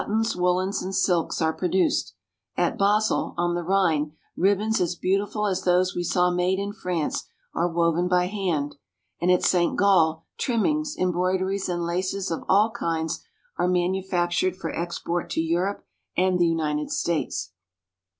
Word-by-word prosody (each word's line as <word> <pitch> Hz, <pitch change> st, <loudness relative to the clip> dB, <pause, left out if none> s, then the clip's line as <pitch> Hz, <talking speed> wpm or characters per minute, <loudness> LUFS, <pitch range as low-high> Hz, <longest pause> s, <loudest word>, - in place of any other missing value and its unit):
tons, 225 Hz, +2 st, 0 dB
woolens, 180 Hz, +2 st, +1 dB
and 190 Hz, +1 st, -4 dB
silks 175 Hz, -4 st, +1 dB
are 160 Hz, 0 st, +2 dB
produced; 180 Hz, -, 0 dB, 0.4 s
at 175 Hz, -, +1 dB
Basel, 210 Hz, +2 st, +1 dB
on 175 Hz, 0 st, +1 dB
the 175 Hz, -, -1 dB
Rhine, 165 Hz, -5 st, +1 dB, 0.2 s
ribbons 205 Hz, +4 st, +2 dB
as 175 Hz, 0 st, 0 dB
beautiful 200 Hz, +4 st, 0 dB
as 190 Hz, -3 st, 0 dB
those 180 Hz, 0 st, +2 dB
we 175 Hz, -, -1 dB
saw 180 Hz, +1 st, +2 dB
made 180 Hz, +1 st, +1 dB
in 200 Hz, +1 st, -3 dB
France 180 Hz, -6 st, -2 dB, 0.3 s
are 175 Hz, -, +1 dB
woven 170 Hz, +1 st, +1 dB
by 180 Hz, 0 st, +3 dB
hand, 180 Hz, -8 st, -2 dB, 0.4 s
and 175 Hz, -, +2 dB
at 180 Hz, -1 st, +4 dB
St. 175 Hz, -2 st, +2 dB
Gall 165 Hz, -5 st, +3 dB
trimmings, 300 Hz, +6 st, 0 dB
em 185 Hz, -1 st, +1 dB
broideries, 185 Hz, +2 st, 0 dB
and 175 Hz, -1 st, -1 dB
laces 185 Hz, +2 st, -2 dB
of 165 Hz, -, -3 dB
all 210 Hz, +4 st, +4 dB
kinds 165 Hz, -8 st, -2 dB, 0.4 s
are -, -, +2 dB
manufactured 180 Hz, 0 st, 0 dB
for 190 Hz, -, -5 dB
export 170 Hz, 0 st, -3 dB
to -, -, -2 dB
Europe 175 Hz, +5 st, -1 dB, 0.3 s
and 185 Hz, 0 st, +2 dB
the 175 Hz, -, +4 dB
United 150 Hz, -2 st, -1 dB
States. 155 Hz, -, -2 dB
180 Hz, 155 wpm, -25 LUFS, 170-195 Hz, 0.4 s, at